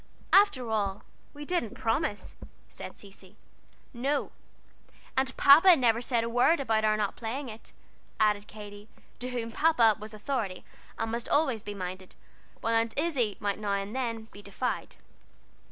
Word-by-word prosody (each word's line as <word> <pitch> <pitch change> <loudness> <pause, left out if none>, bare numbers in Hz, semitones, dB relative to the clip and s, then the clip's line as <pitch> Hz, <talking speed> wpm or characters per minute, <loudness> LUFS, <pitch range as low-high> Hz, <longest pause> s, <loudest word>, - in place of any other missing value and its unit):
"After 280 - +4
all 200 -2 -1 0.3
we 295 0 -9
didn't 290 - -2
promise," 250 -1 -2 0.3
said - - -8
Cecy. 195 0 -14 0.6
"No, 275 +4 -1 0.8
and 265 0 0
Papa 325 +6 +8
never 235 -5 +2
said 240 -2 0
a - - -2
word 245 +8 +3
about 225 -5 +1
our 215 0 +3
not 205 -2 -1
playing 245 +4 -4
it," 220 +1 -11 0.5
added 210 -1 +2
Katy, 205 0 -11 0.3
to 250 - -4
whom 235 -2 -4
"Papa" 235 -7 +4
was 215 +1 -9
authority, 215 -5 -3 0.3
and 225 - -2
must 235 +1 -3
always 275 -7 +2
be 205 -1 -7
minded, 185 0 -7 0.5
while 230 - 0
Aunt 225 0 +1
Izzie 280 -10 0
might 205 -1 -2
now 205 -2 -1
and 200 +3 -3
then 230 -4 -3
be 205 - -12
defied. 205 +5 -4
225 Hz, 155 wpm, -29 LUFS, 210-260 Hz, 0.8 s, Papa